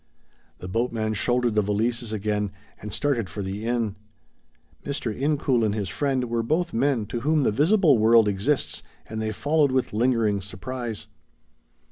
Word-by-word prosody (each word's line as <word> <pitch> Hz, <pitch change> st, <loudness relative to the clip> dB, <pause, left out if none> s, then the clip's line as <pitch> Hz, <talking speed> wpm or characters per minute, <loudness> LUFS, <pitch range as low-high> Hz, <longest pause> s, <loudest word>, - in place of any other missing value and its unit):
The 90 Hz, -, -8 dB
boatman 110 Hz, +1 st, -1 dB
shouldered 120 Hz, +2 st, +1 dB
the 105 Hz, -, +3 dB
valises 110 Hz, +3 st, -1 dB
again, 105 Hz, -1 st, -1 dB, 0.3 s
and 105 Hz, -, -6 dB
started 120 Hz, -8 st, 0 dB
for 100 Hz, +4 st, -5 dB
the 100 Hz, +4 st, -4 dB
inn. 115 Hz, -4 st, -1 dB, 0.9 s
Mr. 130 Hz, -6 st, -3 dB
Incoul 135 Hz, -4 st, +1 dB
and 105 Hz, -1 st, +1 dB
his 100 Hz, -4 st, -2 dB
friend 130 Hz, +5 st, 0 dB
were 115 Hz, 0 st, 0 dB
both 165 Hz, +9 st, 0 dB
men 125 Hz, -2 st, +1 dB
to 120 Hz, +4 st, -4 dB
whom 150 Hz, +4 st, +2 dB
the -, -, +3 dB
visible 155 Hz, -, +4 dB
world 110 Hz, 0 st, +6 dB
exists 105 Hz, +9 st, 0 dB, 0.3 s
and 110 Hz, 0 st, -4 dB
they 110 Hz, 0 st, -1 dB
followed 145 Hz, +4 st, +2 dB
with 130 Hz, -4 st, 0 dB
lingering 110 Hz, -3 st, +2 dB
surprise. 115 Hz, +3 st, -5 dB
115 Hz, 155 wpm, -25 LUFS, 105-130 Hz, 0.9 s, world